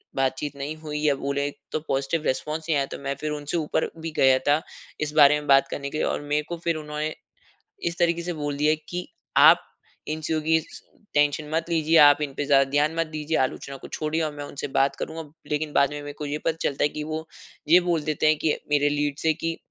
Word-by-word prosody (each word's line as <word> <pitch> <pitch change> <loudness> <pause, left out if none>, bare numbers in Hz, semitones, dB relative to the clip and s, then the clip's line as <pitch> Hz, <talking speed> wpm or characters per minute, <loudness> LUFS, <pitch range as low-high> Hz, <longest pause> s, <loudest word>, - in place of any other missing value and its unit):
बातचीत 135 +2 -1
नहीं 140 +2 -5
हुई 150 -1 -5
या 150 -1 +3
बोले 140 +1 -2 0.2
तो - - -1
पॉजिटिव 135 +4 -1
रिस्पॉन्स 155 +4 -2
नहीं 155 - +3
आया, 140 - +1
तो - - -8
मैं 140 0 -3
फिर 155 - -3
उनसे 150 +2 -3
ऊपर 160 0 0 0.2
भी 165 0 -4
गया 130 -1 +5
था 145 +2 +4 0.4
इस 150 0 -2
बारे 150 0 +7
में 150 - -10
बात 135 -1 +5
करने 140 0 -5
के 155 - -5
लिए - - +1
और - - -2
मेरे 145 +1 -1
को 170 - -3
फिर 170 -1 +1
उन्होंने 150 0 -4 0.8
इस 170 - -8
तरीके 170 -1 +2
से 175 +1 -3
बोल 145 -3 -3
दिया 150 +2 +3
कि 180 0 -4 0.3
आप - - +7 0.4
इन 155 +1 -3
चीज़ों 155 0 -1
की 160 +1 +3
स - - -13
स - - -11 0.3
टेंशन 145 +1 +2
मत 165 +1 -1
लीजिए, 165 0 +2
आप 145 -1 +7
इन 145 -2 -2
पे 145 - -1
ज़्यादा 140 -1 +5
ध्यान 150 +3 +2
मत 165 0 0
दीजिए, 155 0 -3
आलोचना 135 +1 -2
को - - -11
छोड़िए 155 +1 -2
और 155 -1 -2
मैं 145 0 -6
उनसे 140 0 -5
बात 135 +1 +1
करूँगा। 160 +1 -5 0.3
लेकिन 150 0 -1
बाद 140 -1 +3
में 145 0 -5
मेरे 145 0 -7
को 150 - -4
ये 145 +1 -2
पता 160 - +1
चलता 140 - 0
है - - +4
कि 150 +1 -6
वो 155 +1 -4 0.4
ये 175 +3 +7
बोल 175 -3 0
देते 155 0 0
हैं 155 0 +5
कि 155 - +1 0.2
मेरे 145 0 +3
लीड 145 0 -1
से 160 +1 +2
कि, 165 +1 -3
150 Hz, 245 wpm, -25 LUFS, 145-160 Hz, 0.8 s, बारे